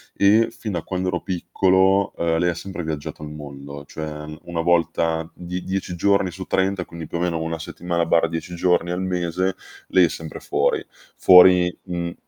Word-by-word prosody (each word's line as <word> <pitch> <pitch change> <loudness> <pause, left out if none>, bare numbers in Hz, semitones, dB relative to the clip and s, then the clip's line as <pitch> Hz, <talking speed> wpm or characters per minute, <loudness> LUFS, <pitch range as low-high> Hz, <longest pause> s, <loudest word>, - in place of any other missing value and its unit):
e 105 +3 +4
fin 115 -3 -6
da 85 -3 -3
quando 95 +1 -3
ero 90 - -2
piccolo, 95 +2 +2
uhm, 80 -1 +1
lei 90 +1 +2
ha - - 0
sempre 90 -1 -6
viaggiato 75 -1 -5
il 75 - -6
mondo, 70 -1 -9
cioè 80 0 -6 0.3
1 85 -1 -3
volta 80 -1 +1
die 90 +1 -5
dieci 95 -2 -3
giorni 100 +1 +2
su 95 +2 -7
30, 95 -1 0
quindi 85 -2 -8
più 85 - -4
o - - -3
meno 85 -2 -1
1 80 0 -3
settimana/10 85 0 -1
giorni 90 0 +1
al 90 +1 -2
mese, 90 0 -1 0.3
lei 95 -2 +5
è - - 0
sempre 80 -1 -7
fuori. - - 0 0.3
Fuori, 90 -1 +7
mhmm 85 -1 -3
85 Hz, 175 wpm, -22 LUFS, 80-95 Hz, 0.3 s, Fuori